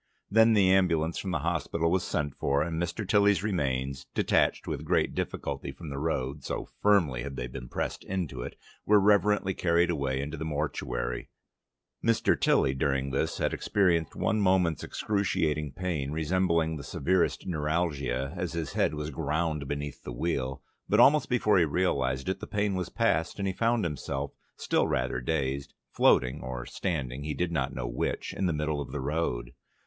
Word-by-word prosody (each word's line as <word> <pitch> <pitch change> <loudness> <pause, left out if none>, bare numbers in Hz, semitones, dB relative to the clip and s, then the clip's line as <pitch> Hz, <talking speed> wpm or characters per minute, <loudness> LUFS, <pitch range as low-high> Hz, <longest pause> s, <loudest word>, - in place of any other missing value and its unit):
Then 110 +2 +6
the 100 -3 +5
ambulance 85 -4 +2
from 95 - -4
the 75 -5 -1
hospital 85 0 0
was 95 0 +2
sent 75 -6 -2
for, 70 +1 +1
and 80 0 -2
Mr. 85 +4 -3
Tilly's 100 -1 +4
remains, 70 -8 -1
detached - - +2
with - - -3
great - - +1
difficulty - - -3
from 80 +1 -9
the 70 - -4
road 70 -3 -2
(so - - -3 0.2
firmly 85 -12 +3
had 70 +1 -5
they 60 - -3
been - - -8
pressed - - -3
into 85 -10 -3
it), - - -6 0.3
were 105 0 +5
reverently 105 -1 +3
carried 85 0 +2
away 70 -4 -1
into 75 +3 -4
the 80 - -4
mortuary 70 -6 -3 0.7
Mr. 115 0 +3
Tilly 65 - +3
during 70 0 0
this 75 +4 -1
had - - 0
experienced 85 -6 +1
one 110 -1 +1
moment's 90 -4 +2
excruciating 80 -8 -1
pain, 85 -7 -2
resembling 80 0 +1
the 70 - -7
severest 90 +7 0
neuralgia 75 -5 -1
as 90 -2 -3
his 80 -3 -3
head - - +1
was 75 +1 -4
ground 75 0 -1
beneath 70 0 -4
the - - -7
wheel, 65 -1 -2 0.3
but - - +3
almost 150 +2 +6
before 110 -6 +3
he 85 - +4
realised 70 -5 0
it, 95 - -1
the - - -7
pain 105 -1 0
was 90 -1 -2
past, 85 -8 +1
and 100 -1 -1
he 95 - -1
found 115 +1 +1
himself, 70 -2 -3 0.3
still - - +1
rather 60 0 -1
dazed, 70 -1 -2 0.2
floating 65 +3 +3
or 65 -1 -5
standing 70 -6 -3
(he 75 0 -3
did 90 -1 -1
no 70 -6 0
know 65 -2 -5
which) - - -2
in 95 - 0
the - - +1
middle 75 -1 -1
of - - -7
the 75 - -3
road. 65 -4 -2
80 Hz, 175 wpm, -29 LUFS, 70-90 Hz, 0.7 s, Then